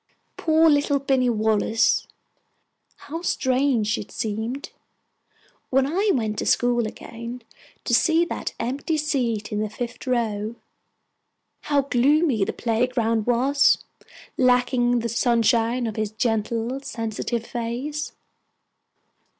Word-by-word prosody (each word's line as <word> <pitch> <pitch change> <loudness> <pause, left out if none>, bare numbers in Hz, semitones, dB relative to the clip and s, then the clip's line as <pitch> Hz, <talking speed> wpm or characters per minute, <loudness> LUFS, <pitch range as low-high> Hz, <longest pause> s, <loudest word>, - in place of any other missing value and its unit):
Poor 320 0 +3
little 290 -1 +3
Binny 265 -2 +1
Wallace! 220 0 +2 0.9
How 325 +4 -7
strange 255 -8 +1
it 205 - -8
seemed, 225 +6 -4 1.0
when 265 0 +3
I 380 +9 0
went 215 -4 -1
to - - -2
school 240 -2 +2
again, 235 +2 -8 0.4
to - - -2
see 330 +1 +4
that - - -5
empty 280 +6 -2
seat 245 -8 -1
in 210 - -1
the 215 0 -1
fifth 245 +3 -6
row! 225 -3 -1 1.1
How 285 -1 +2
gloomy 275 -2 +2
the - - -1
playground 230 -1 0
was, 260 +4 +4 0.6
lacking 245 -1 +3
the 235 - -2
sunshine 235 +1 +2
of 220 -1 -4
his 215 -1 -1
gentle, 225 +3 -1
sensitive 230 -2 -4
face! 250 +6 -4
240 Hz, 110 wpm, -24 LUFS, 225-275 Hz, 1.1 s, see